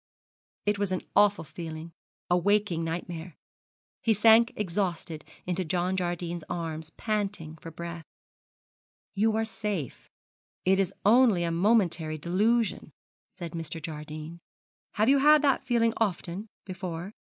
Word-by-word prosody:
It 205 Hz, 0 st, +1 dB
was 200 Hz, -2 st, 0 dB
an 185 Hz, -, -1 dB
awful 205 Hz, -2 st, +5 dB
feeling, 160 Hz, +1 st, -7 dB, 0.4 s
a 175 Hz, -, +3 dB
waking 195 Hz, -2 st, +2 dB
nightmare. 165 Hz, 0 st, -5 dB, 0.7 s
He 225 Hz, -3 st, +3 dB
sank 225 Hz, +3 st, +6 dB
exhausted 170 Hz, -5 st, -2 dB, 0.2 s
into 180 Hz, +1 st, -1 dB
John 180 Hz, +2 st, 0 dB
Jardine's 175 Hz, -2 st, -2 dB
arms, 160 Hz, -2 st, -4 dB
panting 200 Hz, -7 st, -2 dB
for 165 Hz, -, -9 dB
breath. 170 Hz, 0 st, -7 dB, 1.1 s
'You 215 Hz, +2 st, +2 dB
are 225 Hz, 0 st, +1 dB
safe, 210 Hz, -, -4 dB, 0.6 s
it 190 Hz, +1 st, +4 dB
is 195 Hz, -1 st, +1 dB
only 220 Hz, -4 st, +5 dB
a 170 Hz, -, 0 dB
momentary 170 Hz, -4 st, +2 dB
delusion,' 210 Hz, +8 st, +1 dB, 0.4 s
said 170 Hz, -3 st, -6 dB
Mr. 165 Hz, 0 st, -5 dB
Jardine. 155 Hz, +1 st, -7 dB, 0.5 s
'Have 215 Hz, +1 st, +2 dB
you 275 Hz, +1 st, +5 dB
had 300 Hz, +2 st, +6 dB
that 275 Hz, -2 st, +2 dB
feeling 230 Hz, -2 st, +3 dB
often 195 Hz, -1 st, -2 dB, 0.2 s
before?' 185 Hz, 0 st, -5 dB
180 Hz, 130 wpm, -28 LUFS, 165-210 Hz, 1.1 s, sank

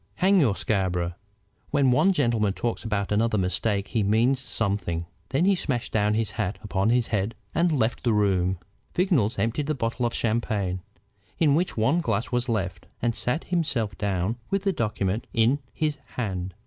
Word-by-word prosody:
"Hang 190 Hz, +1 st, +4 dB
your 120 Hz, -, +3 dB
Scarborough! 90 Hz, -5 st, 0 dB, 0.6 s
When 140 Hz, -3 st, +3 dB
one 190 Hz, +10 st, +4 dB
gentleman 115 Hz, -, +1 dB
talks 120 Hz, +3 st, -2 dB
another 105 Hz, -3 st, -1 dB
about 110 Hz, 0 st, +2 dB
mistakes 100 Hz, +2 st, -1 dB
he 115 Hz, -, +1 dB
means 115 Hz, +6 st, +3 dB
something." 100 Hz, -9 st, -2 dB, 0.2 s
Then 140 Hz, +7 st, +2 dB
he 200 Hz, -, +5 dB
smashed 130 Hz, -10 st, -2 dB
down 105 Hz, -1 st, +2 dB
his 110 Hz, -1 st, 0 dB
hat 110 Hz, -3 st, -2 dB
upon 100 Hz, 0 st, 0 dB
his 120 Hz, -1 st, +2 dB
head 105 Hz, +1 st, -1 dB, 0.2 s
and 170 Hz, +1 st, +2 dB
left 120 Hz, -6 st, 0 dB
the 120 Hz, -, +2 dB
room. 95 Hz, -3 st, +2 dB, 0.4 s
Vignolles 145 Hz, -, +2 dB
emptied 115 Hz, +8 st, 0 dB
the 155 Hz, -, 0 dB
bottle 120 Hz, 0 st, -1 dB
of 115 Hz, -, -5 dB
champagne, 105 Hz, -5 st, 0 dB, 0.6 s
in 150 Hz, -4 st, +4 dB
which 170 Hz, 0 st, 0 dB
one 135 Hz, +11 st, +3 dB
glass 110 Hz, -6 st, -1 dB
was 125 Hz, 0 st, 0 dB
left, 100 Hz, -5 st, -2 dB
and 120 Hz, -1 st, +1 dB
sat 125 Hz, +8 st, -1 dB
himself 130 Hz, -, -1 dB
down 100 Hz, +2 st, -1 dB
with 195 Hz, 0 st, 0 dB
the 195 Hz, -1 st, +1 dB
document 105 Hz, -, -1 dB
in 115 Hz, +5 st, +3 dB
his 150 Hz, -2 st, -1 dB, 0.2 s
hand. 95 Hz, -6 st, -3 dB
115 Hz, 175 wpm, -26 LUFS, 100-135 Hz, 0.6 s, he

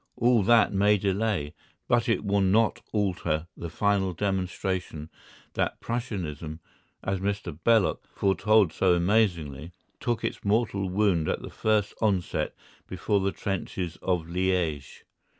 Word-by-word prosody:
All 120 Hz, -1 st, +3 dB
that 115 Hz, +1 st, +4 dB
may 105 Hz, +2 st, +4 dB
delay, 100 Hz, -6 st, -1 dB, 0.3 s
but 120 Hz, 0 st, +2 dB
it 110 Hz, -2 st, +1 dB
will 100 Hz, 0 st, +2 dB
not 105 Hz, +4 st, +2 dB
alter 90 Hz, -6 st, -1 dB
the 85 Hz, -, -6 dB
final 100 Hz, 0 st, +1 dB
demonstration 95 Hz, -4 st, -3 dB, 0.4 s
that -, -, -1 dB
Prussianism, 85 Hz, -, -4 dB, 0.4 s
as 95 Hz, -1 st, -1 dB
Mr. 100 Hz, -4 st, -3 dB
Belloc 115 Hz, -5 st, +3 dB
foretold 100 Hz, -2 st, +3 dB
so 90 Hz, -2 st, +3 dB
amazingly, 85 Hz, -5 st, 0 dB, 0.3 s
took 120 Hz, -2 st, -1 dB
its -, -, -3 dB
mortal 100 Hz, -2 st, +1 dB
wound 90 Hz, -5 st, +1 dB
at -, -, -2 dB
the -, -, -8 dB
first 105 Hz, -2 st, +1 dB
onset 100 Hz, -5 st, 0 dB, 0.3 s
before 105 Hz, -, 0 dB
the 95 Hz, 0 st, 0 dB
trenches 95 Hz, -4 st, -4 dB
of 90 Hz, -3 st, 0 dB
Liège. 85 Hz, -5 st, -1 dB
95 Hz, 130 wpm, -27 LUFS, 90-105 Hz, 0.4 s, that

